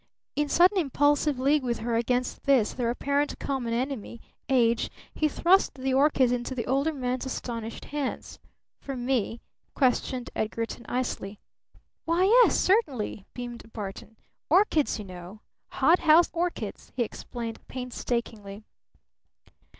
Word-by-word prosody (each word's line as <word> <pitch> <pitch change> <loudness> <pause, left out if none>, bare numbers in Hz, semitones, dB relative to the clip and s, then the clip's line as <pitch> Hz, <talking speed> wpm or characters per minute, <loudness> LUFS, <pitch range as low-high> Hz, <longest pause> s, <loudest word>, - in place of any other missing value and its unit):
In 295 0 0
sudden 370 +5 +5
impulsive 290 -1 +2
league 280 +3 +3
with 240 -2 -1
her 230 +1 -2
against 245 +2 -1
this, 265 -6 +3
their 240 -2 -1
apparent 280 +4 0
common 260 -4 -3
enemy, 235 -1 -3 0.3
Age, 235 -3 +3 0.2
he 310 - +1
thrust 355 +6 +3
the 265 0 -2
orchids 270 -2 +4
into 245 +1 -2
the 235 - -3
older 275 +5 +1
man's 255 -2 -3
astonished 230 -3 -5
hands. 290 -3 -4 0.4
"For 275 - -6
me?" 240 -2 -1 0.3
questioned 255 -1 0
Edgarton 230 +2 -3
icily. 235 -5 -3 0.7
"Why, 335 +2 +2
yes 470 +5 +6
certainly!" 280 - 0
beamed 240 -2 -7
Barton. 210 +1 -7 0.3
"Orchids, 320 - +3
you 210 - -7
know! 185 +3 -10 0.3
Hothouse 335 0 +4
orchids!" 335 - -3
he 250 - +1
explained 230 0 -6
painstakingly. 235 -5 -4
255 Hz, 125 wpm, -27 LUFS, 230-290 Hz, 0.7 s, yes